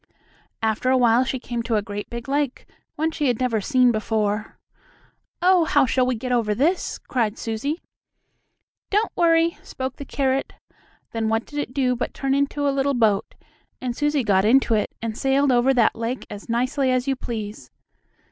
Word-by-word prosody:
After 220 +3 +1
a 260 - +4
while 240 0 +4
she 260 - -2
came 240 -1 -4
to 230 -1 -1
a 210 - +1
great 205 -1 -6
big 235 +1 -7
lake, 280 -1 -1 0.3
one 320 +1 0
she 295 -2 -1
had 245 -3 +1
never 240 -4 0
seen 255 +1 +3
before. 215 -1 -1 0.9
"Oh, 365 -1 +5
how 290 -3 +3
shall 255 0 +1
we 255 - +1
get 250 +3 -4
over 225 -4 +1
this?" 320 - 0
cried 230 -5 -2
Susie. 240 +9 -3 1.1
"Don't 420 +2 0
worry," 335 -1 +3
spoke 260 -1 -5
the 280 - -7
carrot. 270 0 -1 0.6
Then 225 -1 -1
what 225 +1 0
did 295 - -6
it 290 - -3
do 255 -3 +2
but 245 - -4
turn 270 -1 0
into 280 +1 0
a 280 - +2
little 275 0 +1
boat, 220 -4 +1 0.4
and 245 -2 -3
Susie 295 -1 +1
got 195 -3 +3
into 235 +2 +4
it, 215 - +1
and 225 -1 -3
sailed 270 +2 +2
over 245 +2 +4
that 245 -4 +3
lake 230 +3 -3
as 205 +2 -9
nicely 255 +3 +1
as 255 +1 +1
you 270 - +1
please. 210 - -6
250 Hz, 185 wpm, -23 LUFS, 225-275 Hz, 1.1 s, Oh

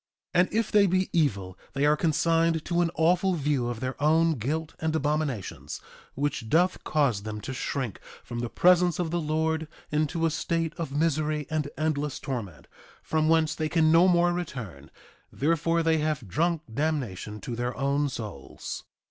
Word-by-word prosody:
3:25 175 - +5
And - - -15
if 225 -1 +1
they 205 -1 +5
be 185 +1 +1
evil 100 - 0
they 140 +1 +1
are 150 +1 +5
consigned 165 +1 +2
to 175 0 +1
an 170 - +2
awful 175 +4 +3
view 145 -5 0
of 120 -2 -4
their 130 +2 -4
own 160 +2 +4
guilt 150 +5 -3
and 160 0 -1
abominations, 145 -8 -2 0.4
which 140 -5 -2
doth 180 +6 +2
cause 140 -9 +1
them 105 0 -5
to 130 - -5
shrink 130 -4 -3 0.2
from 120 - -6
the 120 0 -2
presence 180 +1 +4
of 170 -3 -2
the 170 0 0
Lord 160 +1 0 0.2
into 155 +2 0
a 165 - +2
state 165 0 -1
of 165 -5 -3
misery 150 0 0
and 150 -2 -1
endless 150 -2 -1
torment, 110 - -5 0.4
from 155 0 +1
whence 160 -1 +3
they 155 -1 -2
can 160 -1 +3
no 170 +3 +6
more 175 -1 +4
return; 125 - -6 0.4
therefore 165 +3 +1
they 160 -1 +3
have 150 -7 -1
drunk 165 - 0
damnation 115 -8 -2
to 120 - -5
their 120 +1 -3
own 140 +2 +1
souls. 110 -5 -7
155 Hz, 175 wpm, -27 LUFS, 135-165 Hz, 0.4 s, no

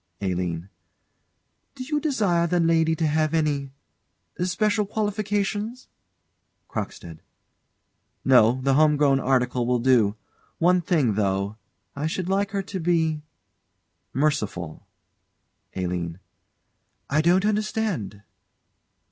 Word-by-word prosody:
ALINE. 90 -3 -2 1.1
Do 260 - -6
you 300 +3 -1
desire 205 - +1
the 175 +1 +1
lady 165 -1 +3
to 160 - -1
have 155 +1 +1
any 145 -3 0 0.7
special 205 +3 +1
qualifications? 210 +2 -2 0.8
CROCKSTEAD. 80 -2 -6 1.0
No 125 -1 +5
the 135 0 +3
home 150 +1 +4
grown 140 -2 +3
article 125 -2 +1
will 125 0 +2
do. 115 -4 +3 0.4
One 180 +2 +3
thing, 150 - +1
though 100 0 -1 0.4
I 145 +2 -2
should 180 +2 -3
like 200 +1 +1
her 200 -1 -2
to 190 0 -5
be 160 -2 +1 0.9
merciful. 105 - -2 0.9
ALINE. 90 -2 -3 0.9
I 150 +2 +2
don't 180 +4 +3
understand. 210 - -1
155 Hz, 105 wpm, -24 LUFS, 120-195 Hz, 1.1 s, No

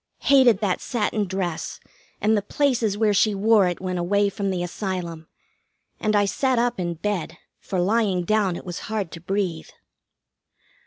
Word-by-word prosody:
Hated 255 -7 +5
that 195 -4 0
satin 215 -3 -1
dress, 180 -3 -3 0.4
and 215 +1 +3
the 205 - +1
places 230 -2 0
where 215 -1 +3
she 210 +1 +3
wore 210 -1 +4
it 175 - -3
when 185 -1 -3
away 200 +3 +2
from 200 0 -3
the 180 -2 -1
Asylum; 175 -3 -4 0.7
and 215 0 +1
I 205 0 +4
sat 260 +5 0
up 240 -3 +1
in 175 -1 -2
bed, 195 0 -3 0.2
for 190 - -3
lying 195 -1 +1
down 205 -3 +1
it - - -8
was 175 -1 -5
hard 210 -6 -2
to 165 - -8
breathe. 180 -3 -2
200 Hz, 165 wpm, -24 LUFS, 180-215 Hz, 0.7 s, Hated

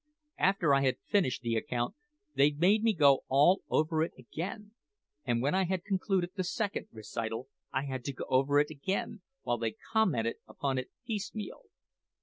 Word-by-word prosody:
After 185 -6 +3
I 140 - +4
had 130 -2 +2
finished 180 - +1
the 115 -1 0
account, 120 +2 -1 0.4
they 140 +1 +5
made 180 +9 +3
me 225 0 +4
go 140 -4 +5
all 145 +8 +5
over 155 0 +2
it 165 - -1
again; 185 - -6 0.5
and 120 -2 +1
when 140 - +2
I 190 0 +3
had 180 0 -1
concluded 190 -3 0
the 190 -2 -2
second 200 +3 -2
recital 115 +3 -5 0.2
I 135 +2 -1
had 130 -2 -4
to 140 - -2
go - - -6
over 135 +2 +3
it 150 +1 +3
again, 190 +8 -3 0.2
while 120 -1 0
they 115 -1 -2 0.2
commented 145 - +2
upon 135 -2 -2
it 130 - -6 0.2
piecemeal. 215 - -5
145 Hz, 170 wpm, -31 LUFS, 130-190 Hz, 0.5 s, they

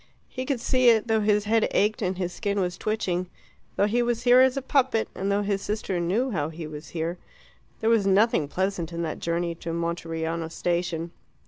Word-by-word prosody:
He 255 - -5
could 275 -4 0
see 255 +1 +3
it, 225 -1 +4
though 225 -1 +2
his 210 0 +2
head 220 +1 +2
ached 210 +2 +1
and 185 -2 -1
his 180 -1 -3
skin 200 +1 -2
was 180 -1 -1
twitching, 185 -3 -2 0.5
though 200 - +3
he 230 +4 +1
was 240 -1 -1
here 245 0 +6
as 260 +1 +4
a - - 0
puppet, 260 -5 +2
and 195 +1 -2
though 205 +1 +1
his 200 -1 -1
sister 205 -3 -2
knew 210 +10 0
how 155 -6 -1
he 160 0 -7
was 150 +1 -8
here. 170 +1 -3 0.6
There 220 - +2
was 215 -4 +3
nothing 195 -5 +3
pleasant 185 0 -2
in 170 0 -3
that 160 - -4
journey 170 0 -1
to 165 0 -6
Monteriano 165 -1 -3
station. 170 -1 -2
195 Hz, 205 wpm, -26 LUFS, 170-220 Hz, 0.6 s, here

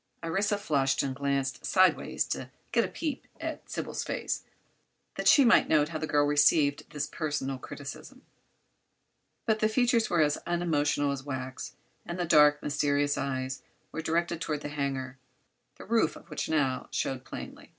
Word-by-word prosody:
Orissa 195 +5 0
flushed 140 -8 +1
and 135 -1 -2
glanced 135 -2 -1
sidewise 185 -1 +3
to - - -3 0.2
get - - +3
a - - -1
peep 300 -5 -4
at - - -5
Sybil's - - -3
face, - - -2 0.7
that - - -2
she 280 - +7
might 235 - +5
note 150 -1 +3
how 160 -2 -4
the 155 - -3
girl 145 -1 +3
received 145 0 +3
this 150 -3 -3
personal 145 -4 -3
criticism. 145 - -9 1.2
But 220 -2 +2
the 215 - +3
features 235 0 +2
were 170 -2 +3
as 150 -1 +2
unemotional 150 -4 +1
as 140 -1 -3
wax 130 -2 -6 0.3
and 170 - -5
the 175 - -1
dark, 150 -2 +5
mysterious 145 0 +1
eyes 130 -1 -3 0.3
were 160 - -4
directed 170 +1 -1
toward 150 -2 -2
the 145 - -5
hangar, 135 -3 -3 0.6
the - - -11
roof - - +2
of - - -15
which - - -3
now 135 -5 0
showed 130 -1 -2
plainly. - - -9
150 Hz, 160 wpm, -29 LUFS, 140-170 Hz, 1.2 s, she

